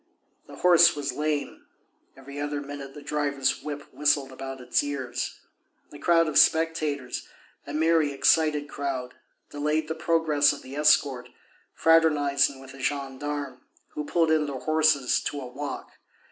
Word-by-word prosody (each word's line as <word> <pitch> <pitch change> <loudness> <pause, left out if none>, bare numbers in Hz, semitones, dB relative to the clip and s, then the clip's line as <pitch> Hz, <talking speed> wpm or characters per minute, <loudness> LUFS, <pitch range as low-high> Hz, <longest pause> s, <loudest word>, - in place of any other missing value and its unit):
The - - -11
horse 175 -2 +5
was 145 -1 -3
lame; 150 -1 -3 0.5
every 140 +1 -9
other 145 0 -3
minute 140 -1 -8
the 145 - -10
driver's 145 -2 -1
whip 145 -1 -6
whistled 145 -2 +1
about 135 0 -7
its 125 -1 +1
ears. 130 -4 -4 0.5
The 145 - -11
crowd 165 0 +3
of 155 - +3
spectators, 155 -5 +1 0.4
a 145 - -6
merry, 160 -1 +2
excited 145 +1 +2
crowd, 135 -4 -4 0.4
delayed 150 +2 -1
the 160 - -2
progress 160 -3 +2
of 145 - -10
the 130 +2 -9
escort, 140 -4 +2 0.5
fraternizing 145 -4 +3
with 135 0 -12
the 135 0 -12
gendarmes, 140 0 -4 0.3
who 150 - -5
pulled 165 +1 +1
in 155 -1 +2
their 140 -2 -4
horses 155 -4 +2
to 145 - -3
a 135 - -7
walk. 140 +4 -7
145 Hz, 145 wpm, -26 LUFS, 140-155 Hz, 0.5 s, horse